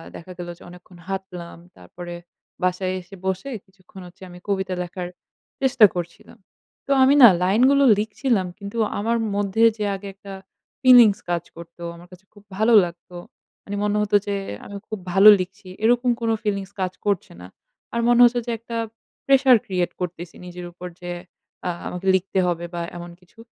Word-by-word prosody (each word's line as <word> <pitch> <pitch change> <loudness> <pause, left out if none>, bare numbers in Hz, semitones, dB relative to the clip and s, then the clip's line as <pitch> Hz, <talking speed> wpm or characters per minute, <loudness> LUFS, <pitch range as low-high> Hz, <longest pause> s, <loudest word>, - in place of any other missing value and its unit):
দেখা 175 +2 -10
গেলো 175 -1 -6
যে - - -24
অনেকক্ষণ 180 0 -15
হাঁটলাম। 185 -3 -6 0.2
তারপরে 175 - -10 0.5
বাসায় 185 +1 0
এসে 180 +2 -14
বসে 190 +8 -2 0.2
কিছুক্ষণ 190 0 -16
হচ্ছে 175 +2 -19
আমি 175 0 -12
কবিতা 190 -2 -1
লেখার 180 0 -6 0.5
চেষ্টা 260 -4 +6
করছিলাম। 175 +7 -7 0.5
তো - - -4
আমি 270 +2 +5
না - - +13 0.2
লাইনগুলো 255 +9 +4 0.2
লিখছিলাম 215 -1 -1
কিন্তু 200 +2 -8 0.2
আমার 230 +3 0 0.2
মধ্যে 205 +2 0
যে 210 - -3
আগে 195 +1 -9
একটা 195 0 -11 0.5
ফিলিংস 245 -6 +7
কাজ 170 -1 -1
করতো 170 0 -12
আমার 175 +1 -15
কাছে 180 +1 -16
খুব 205 -1 -18
ভালো 220 +3 +3
লাগতো, 175 +1 -11 0.5
মানে 205 - -6
মনে 210 0 0
হত 210 -1 -3
যে 200 - -1 0.3
আমি 200 - -9
খুব 215 - -5
ভালো 195 +3 +8
লিখছি, 190 +1 -7 0.2
এরকম 245 +2 +3
কোন 230 - 0
ফিলিংস 200 -2 -2
কাজ 185 0 -1
করছে 200 -3 -1
না। 90 - -10 0.5
আর 235 - -1
মনে 240 0 +4
হচ্ছে 240 0 +5
যে - - -1
একটা 230 +1 -6 0.5
প্রেশার 265 -2 +6
ক্রিয়েট 180 -2 -1
করতেছি 175 -1 -6
নিজের 180 0 -8
উপর 175 +1 -9
যে 175 0 -5 0.6
আ - - 0 0.2
আমাকে 180 +2 -6
লিখতে 190 +1 -1
হবে 175 -1 -2
বা 170 - -3 0.2
এমন 175 0 -8
কিছু। 180 +5 -25
190 Hz, 170 wpm, -22 LUFS, 180-215 Hz, 0.6 s, না